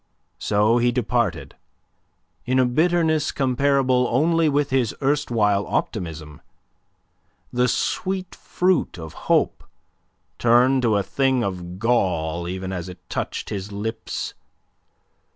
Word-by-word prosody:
So 105 +3 +2
he 120 +1 +3
departed, 115 - -1 0.9
in 130 +1 0
a 130 - +4
bitterness 160 +3 +2
comparable 130 -1 +2
only 160 +5 +2
with 145 -1 0
his 130 -4 +1
erstwhile 120 -8 +1
optimism, 80 -7 -4 1.1
the 125 +1 +2
sweet 185 +9 -2
fruit 180 - 0
of 80 -2 -8 0.2
hope - - +2 0.8
turned 125 +3 +4
to 110 -4 +2
a 100 - 0
thing 130 0 +1
of 90 -2 -5
gall 85 -7 0
even 95 +1 -4
as 90 0 -5
it 90 - -13
touched - - -4
his 100 0 -4
lips. 110 +3 -4
120 Hz, 115 wpm, -23 LUFS, 95-135 Hz, 1.1 s, a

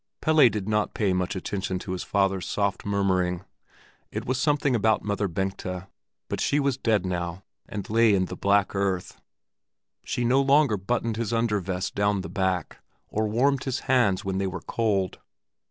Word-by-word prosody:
Pelle 155 -5 +5
did 105 -3 -4
not 105 -1 0
pay 100 -5 +1
much 90 +1 -1
attention 95 0 -3
to 90 - -6
his 95 - -3
father's 95 -2 0
soft 100 -1 -1
murmuring. 95 -2 0 0.6
It - - -5
was 130 +1 -1
something 145 -2 +2
about 110 -1 +2
Mother 105 0 -1
Bengta, 95 +1 -4 0.4
but - - -3
she 145 - +2
was 140 -3 +1
dead 110 -7 +1
now 90 0 -3 0.3
and 105 -4 -5
lay 110 -1 +4
in 95 -1 +2
the - - -6
black 100 0 +2
earth; 95 -2 -2 0.8
she 120 - -2
no 130 +3 +4
longer 140 -3 +4
buttoned 115 +3 -1
his 115 -2 -2
under 115 -2 +1
vest 95 0 -3
down 100 -1 +1
the - - -7
back, 95 -3 -1 0.3
or 110 0 0
warmed 135 +5 +1
his 130 -2 -2
hands 115 -9 +2
when 95 0 -1
they 95 - 0
were 95 - -5
cold. 100 -5 -1
100 Hz, 175 wpm, -26 LUFS, 95-115 Hz, 0.8 s, Pelle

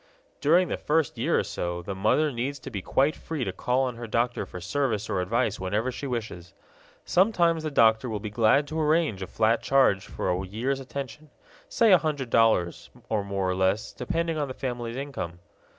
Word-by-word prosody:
During 175 +5 +4
the - - -2
first 155 -1 0
year - - +2
or - - +2
so 85 0 -4
the 100 - -4
mother 110 +11 +2
needs 130 +3 -3
to - - -8
be 100 -4 -4
quite 140 +10 +1
free 155 -5 -4
to - - -2
call 125 +2 0
on 125 -3 -3
her 120 0 -6
doctor 120 +2 -1
for 90 - -8
service 110 +3 -1
or 90 - 0
advice 110 +3 0
whenever 105 +7 -1
she 140 - -6
wishes. 105 -9 -5 0.5
Sometimes 175 -4 +3
the 155 - -2
doctor 115 -3 +3
will 110 -2 -3
be 105 0 -6
glad 120 +6 +3
to 160 +1 -2
arrange 155 - +1
a 95 - -4
flat 115 +1 +1
charge 130 -8 +3
for - - -2
a 90 +1 -1
year's 120 +8 -2
attention, 140 +2 -7 0.4
say 230 - +4
a 180 - +7
hundred 145 -6 -3
dollars, 110 -7 +2 0.2
or 105 -2 0
more 100 -1 -2
or 90 - +1
less, 95 +3 0
depending 165 -2 -2
on 145 - -1
the 130 - -7
family 120 -2 -4
income. 130 -12 -5
120 Hz, 200 wpm, -26 LUFS, 105-145 Hz, 0.5 s, a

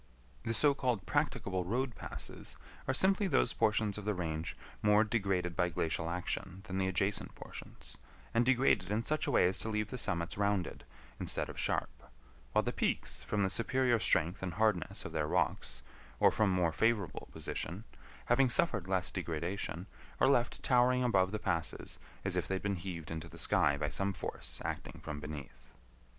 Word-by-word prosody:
The 115 - -1
so 145 +5 +5
called 125 -9 -1
practicable 95 -2 0
road 120 +7 -1
passes - - -7 0.3
are - - +3
simply 195 +6 +4
those 140 -7 +3
portions 105 -1 +2
of 105 - -8
the 105 -1 0
range 80 -2 -3 0.2
more 105 +1 +5
degraded 95 -6 0
by 90 0 +2
glacial 80 0 -1
action 90 +2 -3
than 95 0 -3
the 95 - +2
adjacent 95 +2 0
portions, - - -11 0.4
and 115 - +4
degraded 120 -7 +3
in 105 +2 0
such 155 +3 0
a - - +1
way - - +5
as 95 - +1
to 110 - -3
leave 105 0 -1
the 125 - -4
summits 85 -2 0
rounded, 100 -3 0 0.3
instead - - 0
of - - -7
sharp; - - 0 0.6
while - - +3
the - - -1
peaks, - - -1
from 105 -1 0
the 95 - +2
superior 125 +1 +2
strength 90 -1 +2
and 90 -2 -3
hardness 105 -4 +1
of - - -5
their 80 -2 0
rocks, 60 -4 -1 0.4
or - - +6
from 110 -2 +2
more 90 -3 +2
favorable 110 +1 0
position, 90 +7 -4 0.4
having 130 +2 +4
suffered 110 - +1
less 95 -2 +1
degradation, 85 +2 -3 0.3
are - - +5
left 125 -3 +2
towering 125 0 +4
above 95 -6 +3
the 110 - -1
passes 90 -5 -2 0.3
as - - 0
if - - 0
they 95 - 0
had 95 - -4
been 100 -1 0
heaved 85 -3 -6
into 80 +1 -4
the 80 - -12
sky 70 0 +3
by 75 - -1
some 100 +5 -1
force 65 -7 -5
acting - - -4
from 75 -2 -5
beneath. 75 -5 -8
95 Hz, 180 wpm, -34 LUFS, 85-115 Hz, 0.6 s, or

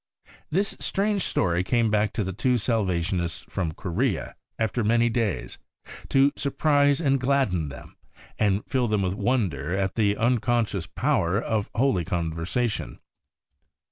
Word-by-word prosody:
This 195 +5 0
strange 200 0 0
story 90 0 +1
came 115 +1 +1
back 105 0 +2
to 110 - -1
the 95 0 -4
two 125 +6 +1
Salvationists 95 -6 -1
from 85 -4 -2
Korea, 100 +8 -2 0.2
after 115 +1 0
many 115 +2 +3
days, 115 -4 -1 0.5
to 135 +1 +4
surprise 145 0 +2
and 135 -4 +2
gladden 125 - +1
them, 70 - -11 0.4
and 100 -1 +1
fill 125 -2 0
them 105 -2 +1
with 90 -1 0
wonder 95 - 0
at 95 -1 0
the 105 -2 +1
unconscious 115 -5 +1
power 105 - +1
of 110 -3 -1
holy 115 -8 +2
conversation. 85 - -2
110 Hz, 135 wpm, -25 LUFS, 90-125 Hz, 0.5 s, to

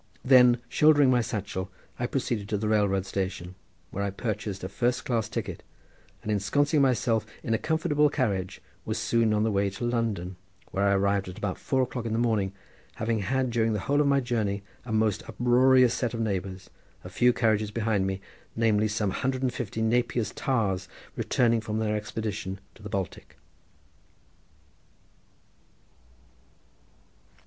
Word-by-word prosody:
Then 125 -2 +6
shouldering 145 -1 +5
my 125 -1 +4
satchel 100 -4 -4 0.3
I 120 - 0
proceeded 120 -6 -2
to 105 - 0
the 105 +1 -2
railroad 100 -3 +2
station, 95 -2 -3 0.4
where 100 - -3
I 100 - 0
purchased 100 -1 -4
a - - -2
first 120 +5 -1
class 115 -4 0
ticket, - - -4 0.6
and 105 - -2
ensconcing 145 - +2
myself 120 -4 +2 0.2
in 115 - -1
a 110 - +1
comfortable 150 -2 +2
carriage 100 -10 -2 0.2
was - - -3
soon 115 -2 +2
on 105 0 +2
the 110 - +1
way 100 0 +1
to 100 - -7
London, 110 -7 -2 0.3
where 100 +1 0
I 100 - +4
arrived 100 -1 +1
at 90 - -9
about 95 -3 -3
four 130 -1 +1
o'clock 125 -2 -4
in 110 - -2
the - - 0
morning, 110 -5 +1 0.4
having 110 0 -1
had 130 +5 0
during 115 -1 +1
the 105 - -2
whole 145 +6 +2
of 145 - +2
my 140 0 +4
journey 110 -5 -1 0.2
a 120 - -6
most 110 -2 +1
uproarious 125 +1 +4
set 120 -2 -2
of - - -4
neighbours 95 -3 -3 0.3
a - - -8
few 125 0 +3
carriages 110 -3 +1
behind 105 -3 0
me, 95 0 -3 0.3
namely 110 -2 +2
some 105 -2 -1
hundred 130 +5 -2
and 125 -2 +1
fifty 110 -3 -4
of - - +2
Napier's 120 -2 +1
tars 100 -8 -1 0.3
returning 115 -2 +2
from 110 -1 -3
their 110 -1 0
expedition 105 -2 -4
to - - -19
the 105 - -7
Baltic. 95 -4 -5
110 Hz, 165 wpm, -27 LUFS, 100-125 Hz, 0.6 s, Then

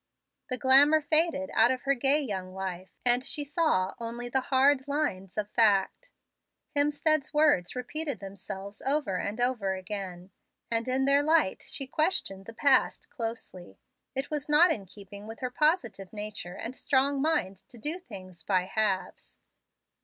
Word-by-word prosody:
The 255 - 0
glamour 280 +4 +6
faded 310 -1 +2
out 225 +2 +5
of 255 -1 -2
her 275 - +2
gay 275 +3 +3
young 190 -9 -5
life, 190 -1 -5 0.2
and 245 +1 +3
she 290 +2 0
saw 285 - 0
only 235 +1 -5
the 265 +2 +1
hard 265 +1 +2
lines 250 -12 -2
of 210 -1 -1
fact. 215 - +2 0.7
Hemstead's 295 +1 +1
words 290 - +3
repeated 285 +4 -3
themselves 195 0 -9
over 270 -8 0
and 210 +4 -4
over 235 -6 0
again, 185 -1 -6 0.4
and 230 +1 0
in 260 +1 +1
their 280 +1 +4
light 310 -9 +2
she 275 -1 -3
questioned 260 - -1
the 230 - -8
past 270 +1 +2
closely. 225 - -7 0.4
It 270 +3 -3
was 300 -1 -3
not 320 +4 +6
in 200 -9 -2
keeping 200 +2 -12
with 225 +1 -9
her 255 -1 -3
positive 245 - 0
nature 210 -4 -6
and 235 +3 -6
strong 275 0 +1
mind 195 - 0
to 245 - -13
do 300 +10 -2
things 185 - -11
by 185 -3 +1
halves. 195 -1 -3
245 Hz, 155 wpm, -28 LUFS, 195-285 Hz, 0.7 s, glamour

